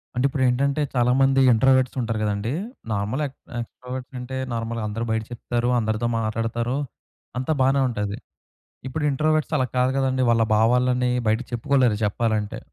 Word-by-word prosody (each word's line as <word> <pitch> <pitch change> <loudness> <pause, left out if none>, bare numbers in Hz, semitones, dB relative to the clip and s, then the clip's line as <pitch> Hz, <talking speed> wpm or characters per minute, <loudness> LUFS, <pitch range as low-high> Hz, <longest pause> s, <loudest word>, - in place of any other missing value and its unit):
అంటే 125 - 0
ఇప్పుడు 135 -1 -2
ఏంటంటే 140 +4 +1
చాలామంది 135 +2 +3
ఇంట్రోవర్ట్స్ 130 +2 +3
ఉంటారు 115 -2 -1
కదండీ! 105 +2 -1 0.4
నార్మల్ 105 +6 -1
ఎక్ 135 0 -10 0.2
ఎక్స్ట్రోవర్ట్స్ 125 +3 -8
అంటే 130 +1 -6 0.2
నార్మల్‌గా 115 -1 -3
అందరూ 115 +2 -3
బయట 110 0 0
చెప్తారు. 120 0 -2
అందరితో 110 0 0
మాట్లాడతారు. 115 +3 -1 0.6
అంతా 130 +5 0
బానే 135 +1 +3
ఉంటాది. 105 -3 -3 0.7
ఇప్పుడు 150 +4 -3
ఇంట్రోవర్ట్స్ 155 +2 +1
అలా 130 -3 +1
కాదు 125 +1 +3
కదండీ! 130 -1 +1
వాళ్ళ 115 -1 +3
భావాలన్నీ 125 +2 +3 0.2
బయటకి 110 +4 0
చెప్పుకోలేరు, 120 -2 +2
చెప్పాలంటే. 105 0 -1
125 Hz, 140 wpm, -23 LUFS, 115-130 Hz, 0.7 s, చాలామంది